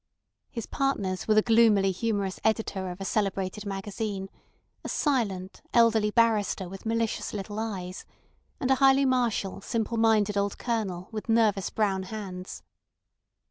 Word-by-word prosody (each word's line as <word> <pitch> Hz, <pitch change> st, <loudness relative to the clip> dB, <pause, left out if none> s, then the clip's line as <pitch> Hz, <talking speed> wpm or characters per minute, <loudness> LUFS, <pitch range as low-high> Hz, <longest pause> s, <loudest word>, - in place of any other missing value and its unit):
His 230 Hz, -3 st, -5 dB
partners 200 Hz, -9 st, -1 dB
were 215 Hz, -, +4 dB
the 215 Hz, -, +5 dB
gloomily 220 Hz, -4 st, +4 dB
humorous 200 Hz, -1 st, -2 dB
editor 210 Hz, -4 st, 0 dB
of 180 Hz, +1 st, -7 dB
a 195 Hz, -, -5 dB
celebrated 195 Hz, 0 st, -1 dB
magazine; 195 Hz, 0 st, -4 dB, 0.5 s
a -, -, -5 dB
silent, 200 Hz, -, -1 dB
elderly 225 Hz, -2 st, +5 dB
barrister 215 Hz, -4 st, +2 dB
with 195 Hz, +4 st, -8 dB
malicious 230 Hz, -1 st, -1 dB
little 205 Hz, +1 st, -5 dB
eyes; 190 Hz, -5 st, -4 dB, 0.6 s
and 260 Hz, -, 0 dB
a -, -, +6 dB
highly 270 Hz, 0 st, +6 dB
martial, 235 Hz, -7 st, 0 dB
simple 230 Hz, +2 st, -2 dB
minded 215 Hz, -2 st, +3 dB
old 200 Hz, 0 st, 0 dB
Colonel 200 Hz, -7 st, -2 dB
with 220 Hz, +1 st, -6 dB
nervous 220 Hz, -4 st, +3 dB
brown 200 Hz, -3 st, 0 dB
hands. 190 Hz, -2 st, -7 dB
210 Hz, 140 wpm, -27 LUFS, 195-230 Hz, 0.6 s, a